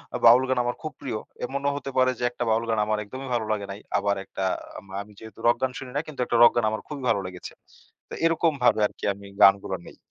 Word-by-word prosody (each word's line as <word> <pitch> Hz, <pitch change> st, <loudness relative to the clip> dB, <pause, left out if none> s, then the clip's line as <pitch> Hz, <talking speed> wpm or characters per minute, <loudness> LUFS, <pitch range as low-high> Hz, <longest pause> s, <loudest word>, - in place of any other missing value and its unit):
আ -, -, +1 dB
বাউল 120 Hz, +3 st, +8 dB
গান 130 Hz, -, +1 dB
আমার 120 Hz, -, -1 dB
খুব 155 Hz, -, -4 dB
প্রিয়। 120 Hz, -6 st, -3 dB, 0.3 s
এমনও 140 Hz, +3 st, -1 dB
হতে 140 Hz, -1 st, -5 dB
পারে 130 Hz, 0 st, +4 dB
যে -, -, -4 dB
একটা 120 Hz, -, -4 dB
বাউল 110 Hz, +1 st, +2 dB
গান 110 Hz, -, +1 dB
আমার 110 Hz, 0 st, 0 dB
একদমই 130 Hz, +5 st, -8 dB
ভালো 115 Hz, -2 st, 0 dB
লাগে 105 Hz, -2 st, -1 dB
নাই। 100 Hz, -, -7 dB, 0.2 s
আবার 100 Hz, 0 st, +1 dB
একটা 95 Hz, -, -5 dB, 0.2 s
আ -, -, -13 dB
আম -, -, -18 dB, 0.2 s
আমি 105 Hz, +1 st, -12 dB
যেহেতু 110 Hz, 0 st, -12 dB
রক 120 Hz, -, +4 dB
গান 130 Hz, -, +1 dB
শুনি 130 Hz, -1 st, -8 dB
না, 145 Hz, -, +1 dB
কিন্তু 155 Hz, -, -9 dB
একটা 120 Hz, -, +1 dB
রক 120 Hz, -, +9 dB
গান 120 Hz, -2 st, +2 dB
আমার 110 Hz, -, -3 dB
খুবই 145 Hz, -3 st, -7 dB
ভালো 115 Hz, -, +3 dB
লেগেছে। 90 Hz, -1 st, -8 dB, 0.6 s
তো -, -, -9 dB
এরকমভাবে 155 Hz, -8 st, +3 dB
আরকি -, -, -20 dB
আমি 100 Hz, +1 st, -13 dB, 0.2 s
গানগুলা 95 Hz, -1 st, +5 dB
নেই। -, -, -13 dB
120 Hz, 250 wpm, -25 LUFS, 105-130 Hz, 0.6 s, রক